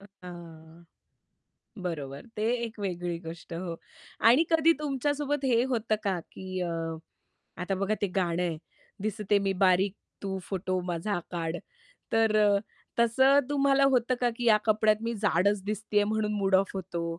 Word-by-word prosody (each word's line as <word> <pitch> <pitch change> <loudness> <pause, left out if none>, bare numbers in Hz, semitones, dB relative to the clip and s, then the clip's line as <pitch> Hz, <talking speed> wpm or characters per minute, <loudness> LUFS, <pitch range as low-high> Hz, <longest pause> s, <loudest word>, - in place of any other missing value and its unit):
अ, - - -15 0.2
हां. 170 -1 -11 1.0
बरोबर, 145 - -5
ते 215 - -2 0.2
एक 225 -1 -8
वेगळी 175 -3 -3
गोष्ट 165 +1 -9
हो. 170 -1 -4 0.4
आणि 250 +8 +6
कधी 325 0 +5
तुमच्यासोबत 290 0 -1
हे 240 -2 +3
होतं 225 -2 +1
का, 190 -3 +1
की 185 -1 -5
अ, 175 -1 -1 0.9
आता 195 +2 -1
बघा 200 +2 +1
ते 205 - +3
गाणं 175 -1 0
आहे, 165 -3 -2 0.4
दिसते 210 -1 +1
मी 195 -1 0
बारीक, 185 +1 +3 0.3
तू 190 -1 -3
फोटो 185 -1 -1
माझा 175 +3 -1
काढ. 165 -1 -2 0.6
तर 225 -1 +3
अ, 205 -1 +4 0.4
तसं 265 +4 +5
तुम्हाला 275 -1 +3
होतं 250 +1 +2
का, 245 - +2
की 245 - -4
या 215 - +7
कपड्यात 215 0 +3
मी 230 +1 -2
जाडच 195 +2 +2
दिसतेय 210 0 0
म्हणून 215 0 0
मूड 195 -2 +1
ऑफ 190 +1 +4
होतो 175 -3 -4
200 Hz, 155 wpm, -28 LUFS, 180-230 Hz, 1.0 s, या